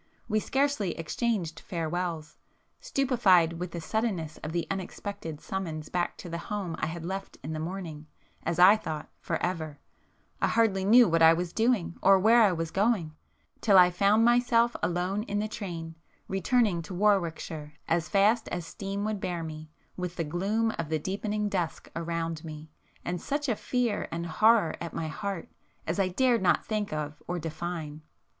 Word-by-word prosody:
We 215 -1 +2
scarcely 265 - 0
exchanged 175 0 -2
farewells,—stupefied 175 - 0
with 180 0 -3
the 170 - -6
suddenness 170 -4 -2
of 155 - -5
the 170 0 -1
unexpected 195 -4 -5
summons 165 -6 -5
back 175 -1 -1
to - - -9
the 170 0 -4
home 190 -3 -4
I - - 0
had 165 0 -6
left 195 +2 -5
in 155 +3 -4
the 155 - -3
morning, 160 -3 -6 0.3
as 170 0 -2
I 185 +4 +8
thought, 155 -7 -5
for - - -2
ever, 160 -5 -3 0.6
I - - +4
hardly 205 -5 +2
knew 235 +3 +7
what 165 0 +2
I 160 0 +8
was 175 +1 -3
doing 225 -7 +1
or 195 +1 +6
where 225 +5 +5
I 210 -3 +6
was 165 -2 -3
going, 195 -6 +1 0.5
till 200 -4 +5
I 180 -1 +7
found 205 +5 +4
myself 240 0 +4
alone 180 +3 0
in 205 - -2
the 210 +1 0
train, 170 -6 -6 0.3
returning 195 -1 +1
to 180 +3 -7
Warwickshire 170 -6 0
as 165 -1 0
fast 210 +4 +3
as 175 -2 -4
steam 200 +2 -4
would 215 -1 -2
bear 175 -3 -3
me, 155 -1 -7 0.3
with 180 -1 -4
the 165 - -1
gloom 200 +8 0
of 165 -3 -2
the 160 - +1
deepening 205 +5 -2
dusk 180 -5 -3
around 165 -1 -3
me, 155 -1 -9 0.3
and 175 0 -2
such 290 +1 -2
a 235 - +1
fear 240 -2 -1
and 170 +1 -3
horror 215 +1 +4
at 170 - -5
my 160 -1 -2
heart 200 +1 -4 0.4
as - - -2
I 195 - +3
dared 240 +5 +2
not 185 - +2
think 215 -2 -2
of 150 -1 -4
or 180 - -2
define. 160 -1 -5
180 Hz, 175 wpm, -28 LUFS, 165-210 Hz, 0.6 s, I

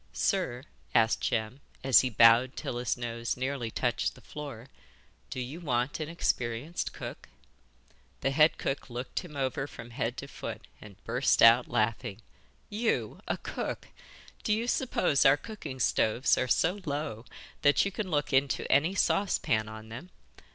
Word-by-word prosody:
'Sir,' 135 - 0 0.3
asked 115 0 +4
Jem, 110 +4 -1 0.2
as 130 -4 +7
he 130 - +1
bowed 115 +3 +5
till 120 - -4
his 125 - -1
nose 115 0 -3
nearly 130 -2 -2
touched 120 +1 -1
the - - -15
floor, 140 -6 -8 0.6
'do - - -5
you 130 +7 -5
want 125 -4 -1
an 155 -1 -4
experienced 130 -2 -2
cook?' - - -8 0.9
The 135 - +1
head 155 +3 +4
cook 135 0 -3
looked 125 +1 -4
him 160 -5 -10
over 135 0 -1
from 120 -4 -11
head 120 0 -2
to 140 - -6
foot, - - -7 0.2
and 105 -2 -12
burst 125 +4 +2
out 115 +2 +7
laughing. 110 -1 -1 0.4
'You 220 +2 -1
a - - -1
cook! - - -5 0.5
Do 215 - +2
you 225 +3 -1
suppose 180 - +2
our 135 +1 +6
cooking 155 - -8
stoves 115 +1 +2
are 130 - 0
so 170 - +2
low 140 -6 -3 0.4
that 145 +5 +4
you 200 - -1
can 200 -1 -4
look 145 -3 -1
into 135 +1 +2
any 155 +8 +3
saucepan 115 - +1
on 110 0 -10
them? 130 +11 -8
130 Hz, 160 wpm, -29 LUFS, 115-150 Hz, 0.9 s, as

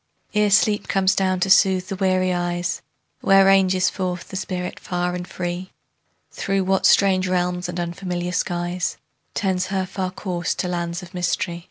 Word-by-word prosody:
Ere 210 -1 +3
sleep 210 +1 +3
comes 190 0 +2
down 185 -1 +1
to 195 - +2
soothe 190 -2 +4
the 195 - -3
weary 185 -1 +1
eyes, 175 0 -2 0.4
Where 195 0 +5
ranges 190 -1 +4
forth 180 -2 -4
the - - -8
spirit 180 -1 -4
far 180 0 -2
and 180 0 -5
free? 175 +1 -4 0.6
Through 195 0 -1
what 190 0 +2
strange 190 -2 +4
realms 180 -1 -1
and 175 0 -4
unfamiliar 175 +1 -3
skies. 175 0 -2 0.4
Tends 185 -2 0
her 190 -1 -1
far 185 0 -3
course 180 -2 -3
to 180 - -2
lands 175 0 -3
of 180 +1 -12
mystery? 175 -1 -1
185 Hz, 165 wpm, -22 LUFS, 175-190 Hz, 0.6 s, Where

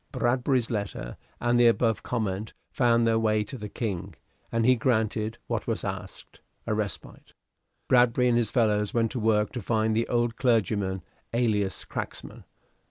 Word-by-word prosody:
Bradbury's 125 0 +1
letter 100 - -4 0.2
and 120 0 +2
the 120 - +7
above 115 -1 +2
comment 110 -3 -3 0.2
found 120 -3 +3
their 115 0 +3
way 110 -1 +2
to 105 - -9
the 105 -4 -6
King, 100 -5 -4 0.4
and 115 -1 +1
he 130 +1 +6
granted 110 -2 0
what - - -3
was - - -2
asked - - -7 0.2
a - - -1
respite. 105 -4 -5 0.5
Bradbury 125 0 +4
and 120 - +3
his 115 -3 0
fellows 105 -4 +1
went 115 -1 +2
to 125 - -3
work 105 -1 +2
to 125 - -5
find 110 +1 +1
the 115 +1 +1
old 120 -1 0
clergyman, 100 -6 +1 0.3
alias 105 -5 0
cracksman. - - -6
115 Hz, 160 wpm, -27 LUFS, 105-120 Hz, 0.5 s, the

